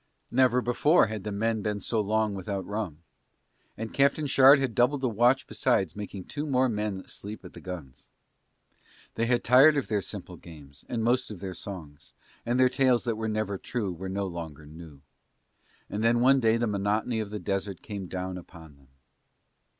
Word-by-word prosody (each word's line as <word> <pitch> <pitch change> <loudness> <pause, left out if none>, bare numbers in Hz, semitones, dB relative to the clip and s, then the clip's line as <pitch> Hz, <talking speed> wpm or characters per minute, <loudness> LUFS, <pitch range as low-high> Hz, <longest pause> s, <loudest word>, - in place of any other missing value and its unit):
Never 125 0 +3
before 145 +7 +4
had 110 -2 -5
the 105 - -4
men 110 +2 0
been 105 0 -2
so 110 +2 -1
long 110 0 0
without 95 0 -4
rum. 100 -7 -5 0.7
And 110 0 -6
Captain 140 +2 +2
Shard 135 0 +7
had 135 -4 -1
doubled 130 +4 +2
the 130 - +1
watch 120 +4 +3
besides 95 - 0
making 100 -2 -6
two 145 +8 -5
more 130 -2 +3
men 105 -4 -3
sleep 105 -1 -8
at 90 - -11
the - - -11
guns. 85 -8 -9 1.0
They 115 - -1
had 120 0 +2
tired 135 +5 +6
of 140 - -2
their 105 -2 +1
simple 90 -3 -7
games, 75 -4 -14
and 115 -2 -2
most 125 +2 +1
of 105 -4 -8
their 95 -1 -5
songs, 85 -8 -9 0.3
and 120 +2 +1
their 130 - +6
tales 130 -1 +2
that 115 -2 -1
were 110 0 -3
never 105 -2 -2
true 105 -7 -3
were 95 +3 -6
no 100 +1 -2
longer 80 -4 -7
new. 75 -2 -12 0.9
And 105 +2 -3
then 115 +1 +3
one 135 +3 +5
day 115 -2 +3
the 120 - 0
monotony 105 +2 0
of 110 -2 -3
the 105 - -5
desert 100 -2 -3
came 100 -4 -6
down 90 0 -4
upon 80 -4 -14
them. 70 -1 -24
105 Hz, 190 wpm, -28 LUFS, 95-120 Hz, 1.0 s, Shard